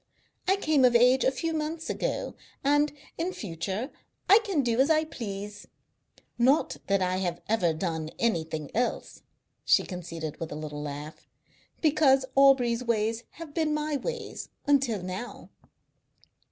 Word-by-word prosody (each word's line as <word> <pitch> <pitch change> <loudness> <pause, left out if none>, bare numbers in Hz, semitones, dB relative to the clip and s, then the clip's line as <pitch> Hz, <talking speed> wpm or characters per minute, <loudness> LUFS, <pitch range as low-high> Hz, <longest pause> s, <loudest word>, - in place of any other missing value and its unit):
I 380 - +5
came 310 -8 +2
of 245 -1 +5
age 250 +2 +5
a - - +5
few 325 +5 -3
months 315 +1 -3
ago, - - -2 0.3
and, 290 +2 +3 0.3
in 345 +3 0
future, 200 - -4 0.4
I 410 - +8
can 390 -11 0
do 235 -1 0
as 270 +3 +4
I 315 -1 +4
please. 205 -7 -7 0.7
Not 265 +6 +3
that 195 -1 +2
I 185 0 0
have 175 -2 -2
ever 195 -6 +2
done 160 -1 -3
anything 160 -9 -1
else," 245 +2 -2 0.4
she - - +4
conceded, 165 -4 -6
with 165 - -5
another 150 0 -6
laugh, 150 +1 -7 0.5
"because 280 -4 +4
Aubrey's 255 -3 +4
ways 225 0 0
have 325 -3 -10
been 310 -1 +1
my 300 0 -1
ways 475 - -5 0.2
until 270 - +2
now." 185 +7 -7
240 Hz, 140 wpm, -28 LUFS, 185-295 Hz, 0.7 s, I